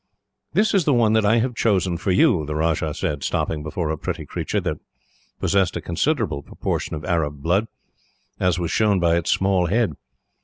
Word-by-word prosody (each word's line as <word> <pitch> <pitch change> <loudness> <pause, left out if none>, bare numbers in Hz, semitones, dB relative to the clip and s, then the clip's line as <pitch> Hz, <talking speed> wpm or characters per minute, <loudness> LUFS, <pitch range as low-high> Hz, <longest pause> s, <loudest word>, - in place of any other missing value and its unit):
"This 215 - +2
is 190 -6 +3
the 145 - +3
one 115 -2 +3
that 110 -2 +3
I 110 - +4
have 125 +2 0
chosen 95 -6 +1
for 90 +3 -3
you," 90 -3 +4
the 75 - -3
Rajah 80 -1 0
said, 75 -6 -2
stopping 75 - -1
before 80 +1 -3
a 80 - -2
pretty - - -4
creature, - - -2
that - - -3 0.6
possessed 95 -3 +1
a - - -2
considerable 95 - -1
proportion 75 - -3
of 75 0 -7
Arab 75 -5 -1
blood, 95 +7 +1 0.7
as 90 -1 +2
was 85 -2 -2
shown 105 -3 +2
by 85 -1 +3
its 85 - -2
small 95 -2 +2
head. 110 -2 +1
90 Hz, 190 wpm, -22 LUFS, 80-110 Hz, 0.7 s, I